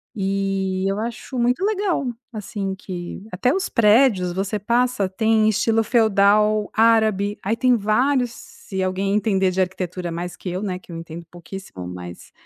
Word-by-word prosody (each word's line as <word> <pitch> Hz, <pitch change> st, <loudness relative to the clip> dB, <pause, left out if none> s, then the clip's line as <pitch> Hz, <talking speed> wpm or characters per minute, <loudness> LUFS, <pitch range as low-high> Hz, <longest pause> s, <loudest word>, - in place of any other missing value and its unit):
E 195 Hz, -1 st, -1 dB
eu 195 Hz, +2 st, -1 dB
acho 235 Hz, +3 st, -5 dB
muito 250 Hz, +11 st, +1 dB
legal, 400 Hz, -8 st, 0 dB, 0.3 s
assim, 200 Hz, -3 st, -4 dB
que 185 Hz, -1 st, -7 dB
até 245 Hz, +8 st, +1 dB
os 380 Hz, +3 st, 0 dB
prédios 210 Hz, -4 st, +4 dB
você 195 Hz, +3 st, -2 dB
passa 235 Hz, -2 st, +1 dB
têm 220 Hz, +2 st, +2 dB
estilo 225 Hz, +1 st, +2 dB
feudal 210 Hz, -2 st, +3 dB
árabe. 220 Hz, -3 st, +3 dB
Aí 220 Hz, +4 st, -1 dB
tem 255 Hz, -1 st, +4 dB
vários 245 Hz, +4 st, +1 dB
se 190 Hz, -4 st, -7 dB
alguém 195 Hz, +2 st, 0 dB
entender 195 Hz, -3 st, +2 dB
de 185 Hz, +1 st, -3 dB
arquitetura 180 Hz, -1 st, -2 dB
mais 175 Hz, +1 st, -5 dB
que 180 Hz, -, -6 dB
eu, 180 Hz, +2 st, -3 dB
né, 190 Hz, -3 st, -3 dB
que 180 Hz, -, -15 dB
eu -, -, -7 dB
entendo 165 Hz, 0 st, -8 dB
pouquíssimo, 175 Hz, -, -9 dB
mas, 90 Hz, -1 st, -9 dB
200 Hz, 160 wpm, -22 LUFS, 185-225 Hz, 0.3 s, prédios